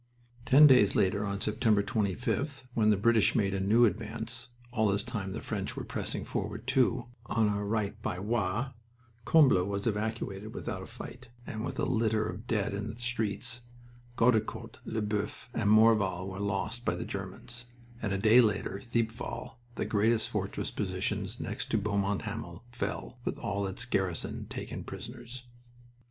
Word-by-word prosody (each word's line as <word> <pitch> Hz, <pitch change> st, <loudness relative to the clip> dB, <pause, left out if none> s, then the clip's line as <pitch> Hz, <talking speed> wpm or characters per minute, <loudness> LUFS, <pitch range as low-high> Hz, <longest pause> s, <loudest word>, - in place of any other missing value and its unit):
Ten 145 Hz, +3 st, +9 dB
days 125 Hz, -8 st, +6 dB
later, 100 Hz, +2 st, +2 dB
on 100 Hz, 0 st, -3 dB
September 105 Hz, -1 st, +2 dB
25th, 125 Hz, -, -1 dB
when 110 Hz, -2 st, +3 dB
the 105 Hz, -, +4 dB
British 115 Hz, +1 st, +4 dB
made 100 Hz, -4 st, +2 dB
a 95 Hz, -, 0 dB
new 110 Hz, +5 st, +5 dB
advance 115 Hz, +3 st, -3 dB, 0.2 s
all 110 Hz, -3 st, +2 dB
this 100 Hz, +1 st, +1 dB
time 105 Hz, -5 st, -4 dB
the -, -, -4 dB
French -, -, -3 dB
were -, -, -3 dB
pressing -, -, -3 dB
forward, 105 Hz, +3 st, -3 dB
too, 130 Hz, -2 st, +2 dB, 0.2 s
on 115 Hz, -2 st, +2 dB
our 105 Hz, 0 st, 0 dB
right 105 Hz, -1 st, -1 dB
by 90 Hz, -, -2 dB
Roye 110 Hz, +4 st, -1 dB, 0.5 s
Combles 130 Hz, -, +5 dB
was 100 Hz, 0 st, -2 dB
evacuated 110 Hz, -1 st, -2 dB
without 100 Hz, -6 st, -4 dB
a -, -, -8 dB
fight 125 Hz, +1 st, -10 dB, 0.2 s
and 110 Hz, 0 st, -4 dB
with -, -, -4 dB
a -, -, +1 dB
litter 110 Hz, -3 st, +1 dB
of 110 Hz, +2 st, -7 dB
dead 105 Hz, -5 st, 0 dB
in 100 Hz, +2 st, -3 dB
its 115 Hz, +2 st, -8 dB
streets; 115 Hz, -1 st, -2 dB, 0.6 s
Gueudecourt, 115 Hz, -2 st, +1 dB
Lesboeufs, 105 Hz, +2 st, -2 dB
and 105 Hz, -3 st, +1 dB
Morval 105 Hz, -4 st, +5 dB
were 95 Hz, 0 st, -6 dB
lost 100 Hz, +4 st, -2 dB
by -, -, 0 dB
the -, -, -4 dB
Germans; 120 Hz, 0 st, -6 dB, 0.4 s
and -, -, -1 dB
a 100 Hz, -, +1 dB
day 110 Hz, +5 st, +7 dB
later 100 Hz, -3 st, 0 dB
Thiepval, 115 Hz, +1 st, -3 dB, 0.2 s
the -, -, -1 dB
greatest 110 Hz, +1 st, +2 dB
fortress -, -, -2 dB
position -, -, -1 dB
next -, -, -4 dB
to -, -, +2 dB
Beaumont 100 Hz, -1 st, 0 dB
Hamel, 85 Hz, +2 st, -6 dB
fell, 125 Hz, +1 st, -4 dB
with -, -, -2 dB
all 100 Hz, 0 st, -2 dB
its 95 Hz, +5 st, -2 dB
garrison 95 Hz, -7 st, -2 dB
taken -, -, -5 dB
prisoners. 120 Hz, +1 st, -8 dB
110 Hz, 165 wpm, -30 LUFS, 100-120 Hz, 0.6 s, Ten